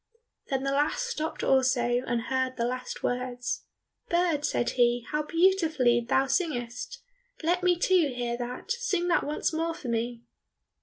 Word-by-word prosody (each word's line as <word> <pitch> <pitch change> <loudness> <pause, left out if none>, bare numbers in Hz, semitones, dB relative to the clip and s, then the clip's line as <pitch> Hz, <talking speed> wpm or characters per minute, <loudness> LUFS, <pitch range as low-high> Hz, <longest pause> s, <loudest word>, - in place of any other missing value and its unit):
Then 270 -2 0
the 275 - 0
last 290 - +1
stopped 320 -10 -3
also, 250 -2 +3
and 235 -1 0
heard 260 0 -1
the 235 - 0
last 255 +1 -4
words. 250 0 -2 0.4
"Bird," 340 -4 +2
said 240 - 0
he, 240 -1 +2
"how 300 0 +1
beautifully 320 -7 +3
thou 265 +3 +2
singest! 250 -5 -2 0.4
Let 350 +3 +2
me, 360 -1 +3
too, 350 -5 +3
hear 240 -1 -2
that. 245 - -5
Sing 470 -8 0
that 350 - +3
once 300 +2 -1
more 330 +1 -1
for 255 - -7
me." 235 +1 -2
265 Hz, 155 wpm, -28 LUFS, 245-330 Hz, 0.4 s, also